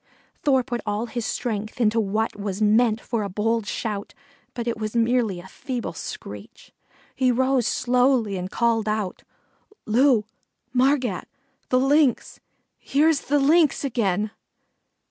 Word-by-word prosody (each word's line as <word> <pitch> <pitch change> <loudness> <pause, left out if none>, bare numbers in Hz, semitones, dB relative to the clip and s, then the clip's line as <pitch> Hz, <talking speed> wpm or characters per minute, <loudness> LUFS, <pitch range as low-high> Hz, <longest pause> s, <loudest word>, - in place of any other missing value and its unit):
Thor 265 -3 +3
put 240 -2 -4
all 210 +2 -2
his 240 -1 -4
strength 215 -1 -3
into 225 -1 +3
what 215 +1 -1
was 200 -1 -4
meant 220 +1 +3
for 230 -1 -3
a 200 - -3
bold 215 +2 -1
shout, 210 -3 -4 0.4
but 240 -1 -4
it 230 -2 -2
was 215 +1 -4
merely 230 -5 +1
a 180 - -11
feeble 250 +4 -5
screech. - - -9 0.4
He 255 -1 +2
rose 260 -1 +2
slowly 250 -4 +2
and 185 0 -4
called 230 -1 +1
out: 210 -3 -2 0.6
"Loo, 235 -1 +3 0.5
Margat! 255 -5 +1 0.4
The 255 - +3
Lynx 275 0 +2 0.4
here's 305 +1 +2
the 290 - +1
Lynx 295 +2 +3
again!" 215 -6 0
235 Hz, 135 wpm, -24 LUFS, 215-255 Hz, 0.6 s, Thor